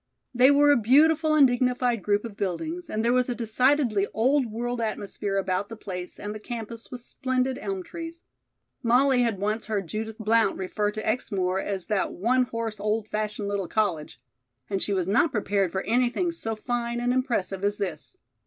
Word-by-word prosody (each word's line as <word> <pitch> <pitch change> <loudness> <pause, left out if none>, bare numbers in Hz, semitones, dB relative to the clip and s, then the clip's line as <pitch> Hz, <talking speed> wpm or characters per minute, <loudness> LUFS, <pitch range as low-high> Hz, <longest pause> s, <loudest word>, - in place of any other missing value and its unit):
They 250 +2 +6
were 290 +1 +6
a 285 - +5
beautiful 310 +7 +4
and 290 -2 +7
dignified 245 -2 +1
group 205 +3 +1
of 220 -3 -7
buildings, 315 - -3
and 220 +1 -1
there 240 - +3
was 255 0 +2
a 245 - -1
decidedly 235 -2 +2
old 260 +3 +3
world 235 +2 -3
atmosphere 205 -2 -3
about 190 +1 -1
the 225 - -7
place 180 -4 -7
and 210 0 -5
the 215 - -7
campus 230 0 -7
with 250 -1 -8
splendid 255 +1 -2
elm 195 -2 -4
trees. 335 - -8 0.6
Molly 250 +2 +4
had 230 -4 +1
once 210 +3 -2
heard 205 -4 -1
Judith 220 +5 -5
Blount 220 -1 +2
refer 205 +3 -1
to 215 +1 -5
Exmoor 190 -5 0
as 195 -2 -3
that 210 -3 -1
"one 250 +7 +2
horse, 230 -3 -4
old 215 +1 -1
fashioned 210 -1 -2
little 200 -2 -2
college," 175 - -1 0.5
and 195 -1 0
she - - -1
was 185 -3 0
not 260 - +3
prepared 200 -4 0
for 190 +1 -2
anything 250 - +1
so 225 -9 -4
fine 240 +1 -2
and 245 +1 +1
impressive 230 -7 -1
as 205 +1 0
this. 185 - -5
225 Hz, 185 wpm, -26 LUFS, 205-250 Hz, 0.6 s, and